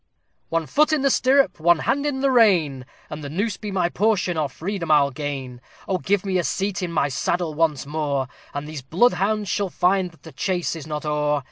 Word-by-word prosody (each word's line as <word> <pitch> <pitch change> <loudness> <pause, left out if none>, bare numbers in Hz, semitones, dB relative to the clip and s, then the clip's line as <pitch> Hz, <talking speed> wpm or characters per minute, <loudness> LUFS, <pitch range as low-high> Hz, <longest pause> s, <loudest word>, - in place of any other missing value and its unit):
"One 165 -1 0
foot 305 - +2
in 305 -3 +1
the 275 - +3
stirrup, 270 -3 +3
one 170 +2 +4
hand 285 - 0
in 265 -2 -2
the 275 -1 +3
rein, 170 - +3 0.2
And 150 0 -6
the 140 - -5
noose 200 +7 -2
be 210 - -6
my 185 -3 +1
portion, 190 -1 +1
or 155 -3 -1
freedom 175 +3 -5
I'll 145 -2 +4
gain! 130 -3 -5 0.3
Oh! 185 -1 0
give 200 +1 0
me 185 -2 +1
a - - 0
seat 195 +3 -2
in 180 -2 -3
my 150 -4 +1
saddle 165 +4 -1
once 150 -3 0
more, 145 -3 -1 0.2
And 145 +1 -5
these 155 -3 -6
bloodhounds 200 - +1
shall 200 +1 -1
find 180 +1 +1
that 165 - -23
the 160 - -11
chase 180 -1 -1
is 155 -2 -8
not 150 -1 -4
o'er!" 150 -1 +1
170 Hz, 215 wpm, -23 LUFS, 150-200 Hz, 0.3 s, one